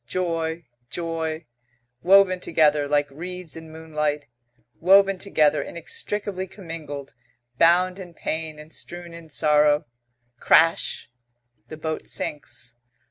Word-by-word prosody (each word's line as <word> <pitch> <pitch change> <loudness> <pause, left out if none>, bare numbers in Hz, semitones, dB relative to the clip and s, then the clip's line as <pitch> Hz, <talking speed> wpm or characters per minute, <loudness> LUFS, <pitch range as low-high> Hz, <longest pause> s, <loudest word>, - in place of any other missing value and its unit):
Joy, 165 -2 -2 0.2
joy. 165 -1 -3 0.6
Woven 190 0 +5
together, 150 -4 +2
like 145 0 +2
reeds 180 +3 -7
in 160 0 -10
moonlight. 150 -2 -2 0.5
Woven 195 +2 +5
together, 155 -6 +2
inextricably 190 +3 -4
commingled, 160 -7 -8 0.5
bound 180 +3 +4
in 175 -3 -10
pain 160 -1 -3
and 150 +1 -12
strewn 175 -1 -7
in 165 -1 -11
sorrow 150 0 +3 0.5
crash! 165 -6 +3 0.6
The 155 - -9
boat 160 0 -4
sinks. 125 -4 -4
160 Hz, 105 wpm, -24 LUFS, 150-180 Hz, 0.6 s, Woven